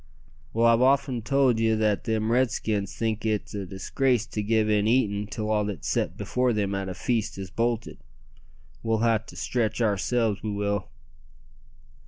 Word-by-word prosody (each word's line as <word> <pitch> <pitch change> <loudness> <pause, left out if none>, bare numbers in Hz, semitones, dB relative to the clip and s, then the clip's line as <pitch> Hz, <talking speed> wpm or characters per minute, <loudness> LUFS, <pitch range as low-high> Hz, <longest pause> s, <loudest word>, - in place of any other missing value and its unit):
"Well, 115 +1 +2
I've 115 0 +5
often 135 -2 +2
told 130 -1 +2
ye 110 0 +3
that 105 -2 +1
them 110 0 0
Redskins 110 -5 0
think 110 -1 -2
it 110 -2 -1
a 100 -2 -4
disgrace 115 +6 0
to 105 - -4
give 110 +1 +2
in 105 -1 +2
eatin' 105 -4 +1
till 105 0 -3
all 105 -1 +2
that's 100 -7 -4
set - - -1
before 125 -1 0
them 100 -2 -1
at 95 -1 -3
a 90 - -5
feast 115 -6 -1
is 95 -2 -7
bolted. 115 -4 -2 0.8
We'll 115 0 +1
ha' 110 -1 +2
to - - -11
stretch 115 -3 -1
oursel's, 110 0 +1
we 110 - -3
will." 100 -1 -1
110 Hz, 170 wpm, -26 LUFS, 105-115 Hz, 0.8 s, I've